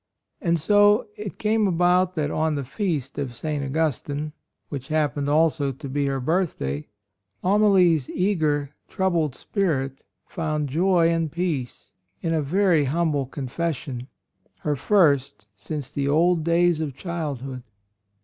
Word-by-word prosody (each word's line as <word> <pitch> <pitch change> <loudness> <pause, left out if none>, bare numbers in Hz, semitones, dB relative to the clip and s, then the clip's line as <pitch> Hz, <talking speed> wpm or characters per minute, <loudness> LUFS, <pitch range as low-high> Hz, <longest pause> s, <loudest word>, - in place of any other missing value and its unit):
And 170 -2 +2
so 205 - +4
it 210 -2 -7
came 215 -1 +2
about 180 +1 +2
that 150 -2 -1
on 155 -1 0
the 140 - -2
Feast 145 - -3
of 130 -4 -4
St. 150 +2 -3
Augustine, 150 0 -2 0.4
which 135 -3 -6
happened 150 -2 0
also 150 -2 +2
to 135 +1 -8
be 140 +1 -1
her 135 -1 -1
birthday, 125 - -1 0.6
Amalie's 185 -7 +4
eager, 155 -7 0 0.2
troubled 170 -7 0
spirit 140 -10 -1 0.3
found 155 -4 -2
joy 170 +3 +3
and 165 -2 0
peace 160 -8 -3 0.3
in 165 - -1
a 160 - +1
very 170 0 +2
humble 150 -2 0
confession 135 -2 -4 0.3
— - - -41
her 150 -1 0
first 140 - +2
since 140 +7 -6
the 140 -2 -1
old 165 +3 +3
days 170 0 +3
of 145 -5 -3
childhood. 140 -6 -4
155 Hz, 135 wpm, -24 LUFS, 140-175 Hz, 0.6 s, so